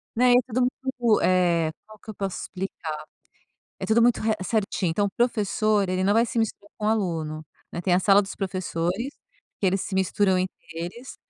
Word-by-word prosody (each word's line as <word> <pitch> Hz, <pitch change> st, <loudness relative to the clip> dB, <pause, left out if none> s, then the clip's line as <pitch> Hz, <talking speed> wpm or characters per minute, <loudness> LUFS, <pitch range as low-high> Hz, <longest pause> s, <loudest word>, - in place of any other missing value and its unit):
Né. 245 Hz, +1 st, +5 dB
E 245 Hz, -, +6 dB
todo 255 Hz, +1 st, -1 dB
mundo, 250 Hz, -2 st, +1 dB
eh, 175 Hz, -3 st, +3 dB
qual 215 Hz, 0 st, -14 dB
que -, -, -15 dB
eu -, -, -4 dB
posso 195 Hz, -2 st, -3 dB
explicar? 170 Hz, -5 st, -5 dB, 0.8 s
É -, -, -4 dB
tudo 225 Hz, +2 st, +4 dB
muito 240 Hz, 0 st, +4 dB
re 220 Hz, 0 st, +1 dB
certinho, 195 Hz, -3 st, 0 dB
então 200 Hz, +5 st, +1 dB
o -, -, -3 dB
professor, 215 Hz, -3 st, +1 dB
ele 185 Hz, 0 st, 0 dB
não 200 Hz, -, +4 dB
vai 230 Hz, +2 st, +4 dB
se 235 Hz, -, -3 dB
misturar 205 Hz, -2 st, -2 dB
com 210 Hz, -, -6 dB
o -, -, +3 dB
aluno, 165 Hz, -8 st, -1 dB, 0.3 s
né. 170 Hz, -, -3 dB
Tem 180 Hz, 0 st, +2 dB
a -, -, +5 dB
sala 195 Hz, +1 st, +5 dB
dos 195 Hz, -1 st, -5 dB
professores 185 Hz, -, -2 dB, 0.4 s
que 195 Hz, -, +1 dB
eles 190 Hz, +1 st, +2 dB
se 190 Hz, -, -4 dB
misturam 190 Hz, +1 st, +2 dB
entre 185 Hz, +1 st, 0 dB, 0.3 s
eles, 175 Hz, +10 st, -7 dB
200 Hz, 200 wpm, -25 LUFS, 185-225 Hz, 0.8 s, E